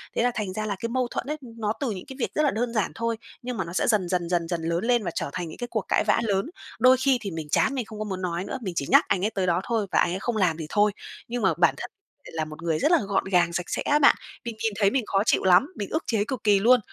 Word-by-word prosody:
Thế - - +2
là 245 - +2
thành 200 -4 -3
ra 215 +1 -3
là 205 - -2
cái 230 - -3
mâu 255 +1 0
thuẫn 260 - -4
ấy, 305 +1 -2
nó 225 -4 -3
từ 265 -5 -1
những 185 -3 -6
cái 265 - -8
việc - - -2
rất 305 - +2
là 285 - +3
đơn 235 +2 -2
giản 215 -4 0
thôi. 230 0 -1 0.2
Nhưng 245 -1 -5
mà 190 - 0
nó 170 - -8
sẽ - - +1
dần 210 -6 +2
dần 175 -2 -1
dần 175 -2 0
dần 170 -1 -2
lớn 170 +2 -1
lên 240 -2 +2
và 175 - -2
trở - - -2
thành 175 -2 -3
những - - -10
cái 245 - -4
cuộc - - -2
cãi - - +2
vã - - +2
lớn. 200 -3 0 0.3
Đôi 255 0 +6
khi 260 0 +3
thì 200 -3 -4
mình 160 -2 -5
chán 270 - +2
mình 250 -4 -2
không 215 -1 -10
có 215 - -2
muốn 190 -2 -4
nói 175 0 -2
nữa, 265 - -4
mình 190 -6 -4
chỉ 140 - -1
nhắc - - +6
anh 190 +1 +1
ấy - - +2
tới 190 -2 -1
đó 175 0 +2
thôi 215 -1 -1
và - - +3
anh 175 - +2
ấy 185 - -3
không 230 +1 -2
làm 180 -5 +2
thì 160 - -5
thôi, 210 +3 +3 0.4
nhưng 240 +1 -3
mà - - +3
bản - - +4
thân - - -6 0.4
lại - - -10
là 160 -1 -2
một 155 +1 -10
người 160 -2 0
rất 300 - +2
là 345 - +6
gọn 195 -1 +1
gàng, 175 -3 +2
sạch 175 0 -2
sẽ - - -1
á 295 +1 +2
bạn, 285 - +6 0.3
mình 235 -2 -4
nhìn 225 -2 +1
thấy 200 -2 +4
mình 260 -5 0
khó 195 0 +1
chịu - - +2
lắm, 185 +7 +5
mình 200 - -4
ức 315 - -1
chế 220 -4 +1
cực 250 -2 -5
kỳ 205 -2 +4
luôn! 245 +4 +5
210 Hz, 330 wpm, -25 LUFS, 180-240 Hz, 0.4 s, Đôi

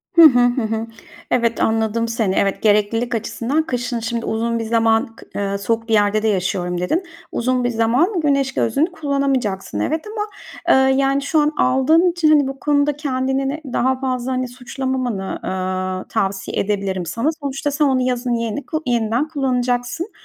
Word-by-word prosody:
Hı 335 - +8
hı, 265 -6 +8
hı 245 +1 +3
hı. 225 +1 -2 0.4
Evet, 235 -2 +1
anladım 225 +1 +1
seni. 225 -4 0
Evet, 195 -1 +1
"Gereklilik 220 +3 +2
açısından 240 +7 -1
kışın, 245 -4 -2
şimdi, 230 +1 -3
uzun 230 +1 -1
bir - - -2
zaman 225 0 +1
kı - - -14
eee, 200 0 -1
soğuk 225 +3 -1
bir 225 - 0
yerde 210 +1 +3
de - - +2
yaşıyorum." 180 -3 -1
dedin. 320 - 0 0.3
Uzun 250 +1 0
bir 245 - +1
zaman 245 - +2
güneş 275 -2 +1
gözlüğünü 285 +10 +1
kullanamayacaksın 275 - -1
evet, 315 +6 -1
ama, 425 0 -3 0.4
eee, 265 0 +5
yani, 275 0 +2
şu 305 +2 +1
an 295 0 +3
aldığın 315 +8 +4
için, 335 -3 +2
hani, 290 -3 +5
bu 270 0 -6
konuda 290 -1 +1
kendini 265 -1 -1
de 310 +3 -4
daha 260 +1 +1
fazla, 255 -1 -2
hani, 255 0 -1
suçlamamanı, 250 -4 -3
aaa, 185 0 -3
tavsiye 195 -2 -2
edebilirim 195 -3 -1
sana. 230 - -1
Sonuçta 280 +1 -2
sen 295 +1 +2
onu 260 -2 +2
yazın 250 -1 0
yeni 230 +4 -2
ku 315 0 -3
yeniden 235 +3 0
kullanacaksın 255 - -1
245 Hz, 170 wpm, -20 LUFS, 225-275 Hz, 0.4 s, Hı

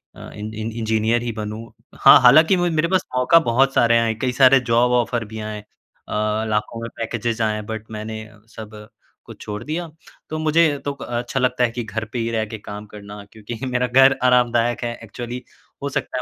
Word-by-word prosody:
अ, - - -11
इन 105 +1 -7
इन 110 +1 -5
engineer 110 +1 0
ही 120 0 -3
बनूँ। 110 0 -6 0.3
हाँ, 135 - +8
हालाँकि 155 +9 +6
मु 175 0 +1
मेरे 160 0 +1
पास 185 +1 +1
मौका 125 +7 +5
बहुत 135 -1 +2
सारे 115 -2 +4
आए 115 - +1
हैं, 110 -1 -2
कई 130 - 0
सारे 130 +1 +5
जॉब 120 +1 +3
ऑफर 120 -1 0
भी 110 +1 -8
आए 110 0 -5
हैं, - - -8 0.5
अ, 110 +1 -1
लाखों 105 +2 -2
में 115 - -5
पैकेजेस 115 0 -3
आए 105 -1 0
बट 110 -1 -6
मैंने 110 0 -6 0.3
सब, 105 -1 -10 0.4
को - - -10
छोड़ 105 +1 -7
दिया। 165 +5 -4 0.4
तो 155 - -4
मुझे 155 +1 +2 0.2
तो 145 - -1
अच्छा 120 -1 -4
लगता 125 -1 +1
है 120 - +1
कि 120 +1 -4
घर 110 +1 -5
पे 125 - -2
ही 115 0 -1
रह 110 -1 -1
के 110 +1 -8
काम 105 +1 -8
करना, 105 0 -10
क्योंकि 110 +1 -9
मेरा 125 -1 0
घर 135 +2 +5
आरामदायक 120 -1 +2
है 120 0 -2
एक्चुअली 120 +3 -7 0.4
हो 140 - -1
सकता 130 - -3
115 Hz, 205 wpm, -21 LUFS, 110-125 Hz, 0.5 s, हाँ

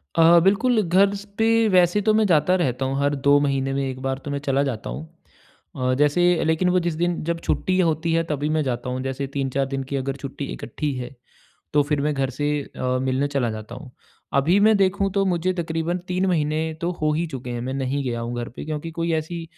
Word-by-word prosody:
अ, 165 +1 +7
बिल्कुल। 220 +5 +3
घर 195 +2 +3
स 200 0 -8
पे 225 0 +3
वैसे 180 +1 +4
तो 215 +1 +3
मैं 220 0 +3
जाता 180 +1 +3
रहता 130 -2 0
हूँ 135 +1 -1
हर 145 +1 +1
2 140 +1 +4
महीने 135 -1 0
में 140 0 -1
1 130 0 -6
बार 135 0 -2
तो 145 - -4
मैं 140 - -2
चला 135 +1 +2
जाता 125 -6 -4
हूँ। 160 - -6 0.7
अ, 130 -1 +1
जैसे 150 +4 +3 0.2
लेकिन 160 +3 +2
वो 180 0 +3
जिस 175 -1 -1
दिन 175 0 -1
जब 170 0 -1
छुट्टी 185 0 +1
होती 165 -1 +1
है 165 0 +2
तभी 150 +1 -1
मैं 155 0 +1
जाता 125 -2 -3
हूँ। 130 +1 -3
जैसे 135 +1 -3
3-4 135 0 0
दिन 135 0 -2
की 140 - 0
अगर 135 0 -2
छुट्टी 140 +1 -6
इकट्ठी 145 +4 -4
है 125 +2 -6 0.6
तो 145 -1 +4
फिर 145 0 -1
मैं 150 +1 0
घर 135 -2 -1
से 145 0 +1
अ, 130 -1 -2
मिलने 130 +2 0
चला 140 -5 -1
जाता 110 +2 -7
हूँ। 130 0 -11 0.4
अभी 160 +9 +3
मैं 215 +1 +5
देखूँ 195 0 +1
तो 195 -1 +2
मुझे 185 0 0
तकरीबन 165 0 -2
3 185 +1 0
महीने 155 -3 +1 0.2
तो 170 +1 0
हो 155 0 +2
ही 165 +3 0
चुके 130 -4 -7
हैं 120 -1 -4
मैं 130 +2 -3
नहीं 135 +1 -2
गया 120 -3 -2
हूँ 120 +1 -4
घर - - -7
पे - - -7
क्योंकि 155 +1 -4
कोई 165 0 0
ऐसी 160 +2 -3
150 Hz, 235 wpm, -23 LUFS, 135-175 Hz, 0.7 s, अ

